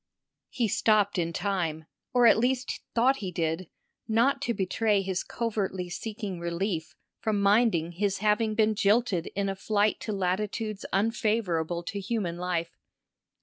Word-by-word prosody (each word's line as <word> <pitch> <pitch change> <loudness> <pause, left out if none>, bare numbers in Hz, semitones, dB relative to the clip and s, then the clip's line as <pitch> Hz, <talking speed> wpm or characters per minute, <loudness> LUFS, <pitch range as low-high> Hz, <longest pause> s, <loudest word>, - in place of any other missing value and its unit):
He 240 -3 0
stopped 205 -2 +2
in 170 -1 0
time, 165 -4 -2 0.3
or 245 -1 +4
at 225 - +7
least 250 +1 0
thought 255 +4 +4
he 190 -6 -4
did, 165 +1 -2 0.4
not 245 +5 +2
to 245 -4 0
betray 200 +1 +1
his 190 -1 -2
covertly 195 -6 -2
seeking 205 -2 -5
relief 170 0 -3 0.2
from 215 -2 0
minding 200 -5 +3
his 200 +3 -1
having 215 +1 +1
been 220 -1 +3
jilted 205 -3 +2
in 200 0 0
a 195 - -2
flight 205 +2 +1
to 220 - -4
latitudes 205 +2 -2
unfavourable 195 -5 0
to 200 +4 -4
human 195 -4 -2
life. 170 -2 -2
200 Hz, 145 wpm, -28 LUFS, 180-220 Hz, 0.4 s, at